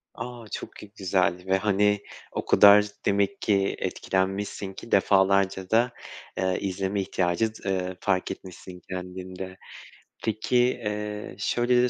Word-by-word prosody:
A! 120 -2 -7
Çok - - -6
gü 105 -1 -12
güzeldi 90 -1 +1
ve, 95 0 +3
hani, 105 0 +2 0.3
o - - -4
kadar 105 0 +7 0.2
demek 100 +6 +1
ki 100 -2 +2
etkilenmişsin 95 +1 -2
ki 115 - -11
defalarca 95 -1 +3
da, 120 +3 +3 0.5
eee, 95 0 +1
izleme 95 +1 -1
ihtiyacı, 95 +4 0
eee, 95 -1 -1
fark 95 -2 0
etmişsin 90 -1 -9
kendinde. 95 0 -6 0.7
Peki, 110 +3 0
eee, 105 -5 -1
şöyle 120 +3 +2
de 125 - +3
100 Hz, 125 wpm, -26 LUFS, 95-105 Hz, 0.7 s, kadar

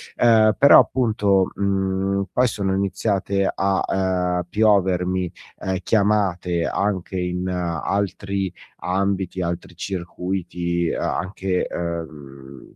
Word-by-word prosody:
Ehm, 110 -2 +5
però, 140 - +8
appunto, 105 -6 +2
mhmm, 95 0 0
poi 125 0 +3
sono 100 -4 -1
iniziate 100 0 0
a, 95 0 +1
ehm, 90 -2 0
piovermi, 95 -4 +2 0.3
uhm, 95 0 -2
chiamate 95 -5 +1
anche 95 -2 -2
in 90 +1 -2
altri 95 +2 -2 0.2
ambiti, 95 0 -1
altri 85 0 -4
circuiti, 90 -1 -3
anche, 90 +1 -2
ehm, 75 -6 -7
95 Hz, 95 wpm, -22 LUFS, 90-100 Hz, 0.3 s, però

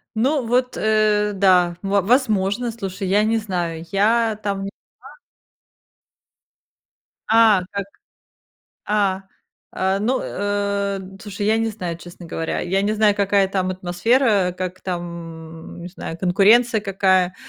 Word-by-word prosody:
Ну, 260 +3 +1
вот, 250 +2 0
э, 215 -1 +2
да, 180 -3 +3
во 200 0 +1
возможно, 225 0 +1
слушай, 195 -3 -5
я 205 +3 +3
не 225 +1 +1
знаю, 175 -6 -3
я 220 +2 +2
там 195 -1 -2
не 195 - -4 0.3
была. - - -14 2.2
А, 220 -4 +5
так. 200 -1 -3 1.0
А, 200 -2 +1 0.5
а, 190 +1 0
ну, 245 +5 0
э, 200 -1 -2 0.2
слушай, 205 -1 -5
я 220 +1 +3
не 225 0 0
знаю, 180 -6 -5
честно 175 +1 -12
говоря, 165 0 -3
я 190 +2 0
не 210 +2 0
знаю, 210 -1 +3
какая 200 -1 +2
там 185 -1 -1
атмосфера, 185 +2 +1
как 185 0 -5
там, 180 -2 -3 0.7
м, - - -10
не 175 - -7
знаю, 170 -2 -7
конкуренция 210 +5 +4
какая, 190 -2 +1
200 Hz, 135 wpm, -21 LUFS, 185-220 Hz, 2.2 s, А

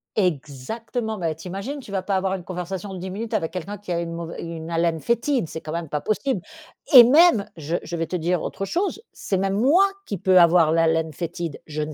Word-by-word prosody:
Exactement! 205 - -2
Bah, 165 -3 -1
t'imagines, 195 - -6
tu 215 - -11
vas 190 -2 -2
pas 195 - -1
avoir 190 0 0
une 180 - -7
conversation 185 +2 -5
de 185 - -6
10 190 +1 -5
minutes 215 +4 -5
avec 160 0 0
quelqu'un 185 +3 -6
qui 205 -3 -8
a 170 - 0
une 170 -1 -4
mauvai 165 0 -6
une 165 -1 -6
haleine 165 -1 0
fétide. 235 - 0
C'est 160 - -6
quand 155 - -7
même 165 -2 -4
pas 150 -1 -2
possible! 220 0 -1 0.5
Et 245 -2 +12
même, 285 - +5
je 160 +3 -2
je 170 - -6
vais 165 - -1
te 180 - -4
dire 175 0 0
autre 195 - -4
chose, 390 - -2
c'est 190 - -2
même 195 0 0
moi, 320 - +5 0.2
qui 200 -5 -4
peut 185 -1 +5
avoir 170 -2 +5
l'haleine 165 -1 +2
fétide, 170 0 -5
je 155 0 -4
ne 150 0 -4
180 Hz, 225 wpm, -23 LUFS, 165-205 Hz, 0.5 s, Et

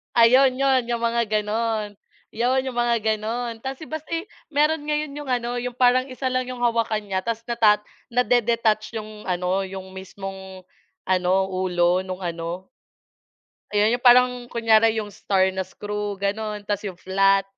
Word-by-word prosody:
Ayun 255 +3 +6
yun, 265 -1 +3
yung 235 -1 -2
mga 235 0 +2
gano'n. 215 0 -1 0.4
Yun 255 +4 0
yung 250 - -8
mga 240 -1 +2 0.2
gano'n 230 +2 -3
tapos 270 +4 -6
basta, 315 0 -6
eh, 335 +4 -2 0.2
meron 300 +1 +2
ngayon 300 -1 -2
yung 290 -3 -5
ano, 240 -1 -1
yung 245 0 -4
parang 255 0 +4
1 255 +1 -3
lang 255 0 0
yung 255 -1 -6
hawakan 230 -3 0
nya 190 -1 -2
tapos 230 -1 -3
nata 225 -3 +4 0.3
nade-detach 230 -2 +1
yung 215 0 -10
ano, 180 +1 -1
yung 190 0 -8
mismong 190 0 -8 0.5
ano, 185 -1 +2
ulo 185 -1 +1
nung 185 -1 -6
ano. 170 +1 -5 1.0
Ayun 210 +1 +3
yun, - - +2
yung 245 - -19
parang 250 +1 +7 0.2
kunyari 225 -1 +3
yung 210 -2 -3
star 190 -1 +1
na 190 - -5
screw, 205 +1 -4
gano'n. 205 +1 -3
Tapos 205 0 -3
yung 190 - -7
flat, 195 +2 +2
220 Hz, 160 wpm, -23 LUFS, 195-245 Hz, 1.0 s, parang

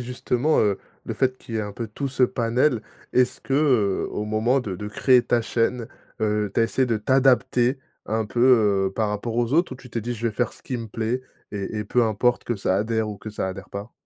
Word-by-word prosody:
justement, 125 +4 0
heu, 100 -2 +2 0.3
le - - -4
fait 130 -1 +1
qu'il 115 -3 -7
y - - 0
ait - - +1
un 105 -1 -5
peu 115 +2 -5
tout 140 +7 -4
ce 135 -1 0
panel, 120 0 +2 0.3
est-ce 125 0 +2
qu'au 125 -8 +1
moment 110 +5 +1
de 100 -7 -5
de 105 - -6
créer 125 +4 +4
ta 120 -1 +2
chaîne, 115 0 -1 0.3
heu, 105 -1 0
tu - - +2
as - - +5
essayé 130 +3 +1
de 115 -2 +1
t'adapter 130 +1 +3 0.3
un 110 +1 -1
peu, 120 - -3 0.5
heu, 95 - -12
par 110 -2 0
rapport 105 +3 -3
aux 120 +1 0
autres 170 -1 +2
ou - - -7
tu 125 -1 -14
t'es 115 - -2
dit 120 +3 -3
je 115 +1 -1
vais - - -5
faire 120 +2 -1
ce - - -16
qui 130 - -3
me 115 -1 -5
plaît 115 +4 -2 0.3
et 100 +1 -4
et 105 - -3
peu 120 +4 +2
importe 115 +3 +1
que 120 - -1
ça 95 -2 0
adhère 110 +1 0
ou 105 - -5
que 110 - -8
ça 105 -2 -3
adhère 95 0 -8
pas? 100 +4 -7
115 Hz, 240 wpm, -24 LUFS, 105-125 Hz, 0.5 s, as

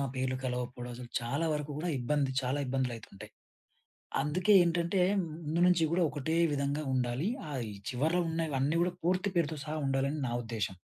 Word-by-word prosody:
పేర్లు 130 0 0
కలవకపోవడం. 125 -1 -3
అసలు 120 -1 -9
చాలా 140 +7 -1
వరకు 150 0 -3
కూడా 170 +3 -2
ఇబ్బంది. 140 +2 +1
చాలా 130 +3 -1
ఇబ్బందులయితుంటాయి. 125 -6 -4 0.9
అందుకే 180 +8 +2
ఏంటంటే 170 +2 +1 0.4
ముందు 160 +3 -1
నుంచి 175 -2 +4
కూడా 175 +1 +3
ఒకటే 155 +3 -2 0.2
విధంగా 140 +2 -1
ఉండాలి. 125 +5 0 0.2
ఆ - - -5 0.4
చివరలో 160 +8 +1
ఉన్నవన్నీ 155 -2 0
కూడా 180 0 +1
పూర్తి 185 +3 +2
పేరుతో 160 -2 +1
సహా 155 +1 -3
ఉండాలని 135 +2 0
నా - - -2
ఉద్దేశ్యం. 105 -5 -3
145 Hz, 150 wpm, -31 LUFS, 125-165 Hz, 0.9 s, నుంచి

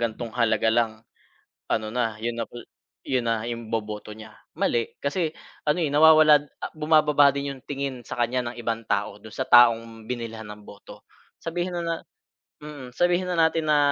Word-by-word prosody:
gantong 115 0 -3
halaga 110 -2 +2
lang 115 -2 +2 0.8
ano 110 -1 0
na, 115 -3 -1
yun 115 +1 -3
na 115 - -2
pa - - -13 0.5
yun 125 -3 0
na 115 -1 0
'yong 115 -1 -6
boboto 105 -1 -4
niya." 110 0 -12 0.2
Mali 115 -1 0
kasi 155 +2 -1 0.3
ano, 150 +4 +1
eh, 155 - +1
nawawala 155 -1 +7 0.3
bumababa 150 -2 +4
din 140 0 -3
'yong 130 - -13
tingin 135 -4 -4
sa - - -7
kanya 120 0 0
ng - - -15
ibang 115 -1 -3
tao 100 0 -1
do'n 110 0 -12
sa 130 -1 -3
taong 115 -2 +5
binilhan 115 -2 -5
ng 105 0 -10
boto. 100 - -14 0.4
Sabihin 175 +2 -3
na - - -1
na 165 - -1 0.7
mm, 135 -5 -9
sabihin 175 +1 +2
na 180 - -1
natin 160 -1 +2
na 150 -1 +4
125 Hz, 175 wpm, -25 LUFS, 115-150 Hz, 0.8 s, nawawala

